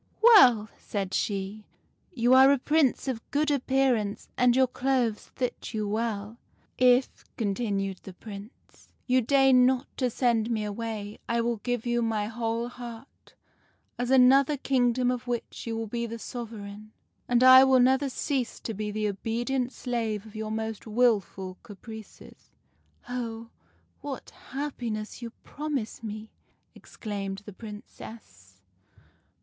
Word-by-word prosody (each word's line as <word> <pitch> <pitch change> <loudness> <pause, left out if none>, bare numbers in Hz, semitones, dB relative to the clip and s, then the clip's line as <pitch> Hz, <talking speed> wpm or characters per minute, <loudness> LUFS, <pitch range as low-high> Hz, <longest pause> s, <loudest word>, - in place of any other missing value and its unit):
" - - -37
' - - -39
Well,' 250 - +7
said 195 -2 -4
she, 200 +1 -2 0.5
'you 245 -5 +2
are 265 +1 +8
a 280 - +4
Prince 290 0 +1
of 245 -4 -2
good 295 +1 +1
appearance, 260 -6 0
and 250 -1 +4
your 260 0 +5
clothes 250 -3 -1
fit 250 -2 -4
you 215 - -1
very 205 0 -3
well.' 220 -1 -3 0.2
" - - -37
' - - -45
If,' 250 +1 +3
continued 200 -3 -2
the 190 - -10
Prince, 205 +3 -12
' - - -42
you 255 0 +3
deign 265 0 +5
not 260 +1 +1
to 255 -2 +1
send 235 -2 +1
me 220 -2 -1
away, 210 0 -5
I 235 0 +1
will 235 0 -1
give 245 +2 -3
you 240 0 +1
my 220 -2 0
whole 230 +1 -2
heart, 245 0 -11 0.6
as 245 0 -1
another 265 +2 +5
kingdom 250 -2 +1
of 250 0 -4
which 240 0 -4
you 225 -1 -2
will 225 - -3
be 235 +2 -3
the 230 +1 -6
sovereign; 215 -3 -8 0.3
and 245 0 +3
I 260 0 +10
will 265 -1 +5
never 265 +2 +3
cease 260 -1 -2
to 225 - -4
be 210 +1 -4
the 215 0 -1
obedient 240 +5 -2
slave 225 -6 -3
of 220 0 -14
your 215 0 -4
most 220 0 -4
wilful 210 -5 0
caprices.' 220 0 -12 0.2
" - - -40
' - - -39
Oh, 230 -2 -5 0.5
what 280 -2 -7 0.2
happiness 245 -6 -4
you 235 - -5
promise 290 -8 -4
me! 215 0 -7 0.2
' - - -45
exclaimed 200 -2 -6
the 210 - -9
Princess. 205 - -12
235 Hz, 155 wpm, -27 LUFS, 215-255 Hz, 0.6 s, I